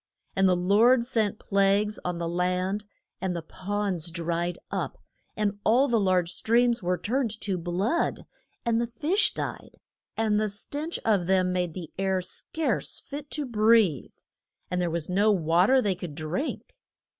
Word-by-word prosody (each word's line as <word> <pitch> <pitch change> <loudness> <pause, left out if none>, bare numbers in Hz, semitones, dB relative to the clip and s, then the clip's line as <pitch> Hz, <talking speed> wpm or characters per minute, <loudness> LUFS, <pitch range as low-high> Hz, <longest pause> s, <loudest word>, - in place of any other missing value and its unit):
And 195 0 +4
the 180 - +4
Lord 215 +8 +4
sent 220 -4 0
plagues 200 +1 +1
on 180 -1 -2
the 170 -1 -2
land, 180 +4 -1 0.4
and 185 -2 -1
the 170 - -4
ponds 185 -1 -2
dried 170 +1 -2
up, - - -3 0.4
and 205 -1 -1
all 250 +6 +4
the 235 -3 +2
large 185 -3 +2
streams 235 +4 +2
were 180 0 0
turned 250 +4 0
to 195 -2 -1
blood, 180 - -1 0.4
and 230 0 +2
the 235 - -1
fish 305 - +1
died, - - -5 0.4
and 215 -1 +2
the 215 0 0
stench 290 +11 -4
of 200 -6 +2
them 185 -1 +2
made 180 -3 -1
the 175 -4 -7
air 190 -1 +1
scarce 300 - -3
fit 290 0 -8
to 295 0 -3
breathe. 220 - +3 0.6
And 180 0 0
there 175 - 0
was 165 -1 -2
no 200 +4 +3
wa 170 -1 +3
ter 265 +1 +5
they 200 -2 +2
could 175 -4 -7
drink. 160 - -4
195 Hz, 165 wpm, -27 LUFS, 180-225 Hz, 0.6 s, ter